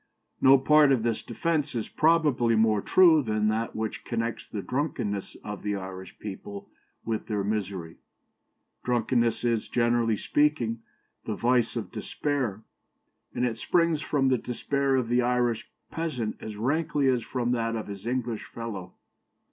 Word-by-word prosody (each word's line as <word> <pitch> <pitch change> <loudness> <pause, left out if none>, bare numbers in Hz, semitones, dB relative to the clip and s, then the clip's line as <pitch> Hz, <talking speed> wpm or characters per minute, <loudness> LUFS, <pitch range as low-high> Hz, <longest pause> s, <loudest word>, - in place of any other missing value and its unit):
No 135 +1 +8
part 150 +1 +5
of 125 -4 +2
this 115 -1 0
defence 150 +3 -1
is 115 - -2
probably 150 -8 +3
more 110 -2 +3
true 170 - +6
than 110 -3 0
that 110 +2 -2
which 110 0 -3
connects 115 -1 -3
the 100 -3 -5
drunkenness 125 -8 -2
of 105 -2 -6
the 105 0 -1
Irish 95 -1 -8
people 100 0 -8 0.4
with 110 -1 -2
their 105 -3 -1
misery. 95 -5 -3 0.9
Drunkenness 120 -1 +1
is, 115 -2 0
generally 120 -2 +2
speaking, 125 -6 +1 0.4
the - - -2
vice 120 -1 +2
of 110 -6 -4
despair; 130 -8 -2 0.7
and 125 - +1
it 115 -2 -2
springs 165 -3 +2
from 135 -4 +1
the 130 -2 +2
despair 135 +2 0
of 130 -3 +1
the 120 +1 +2
Irish 120 -2 0 0.2
peasant 130 -10 -2
as 110 -1 -7
rankly 145 +4 +1
as 125 -2 +2
from 120 0 -2
that 115 -1 0
of 110 - -3
his 100 +1 -8
English 120 -3 -2
fellow. 110 -6 -7
120 Hz, 150 wpm, -27 LUFS, 110-135 Hz, 0.9 s, No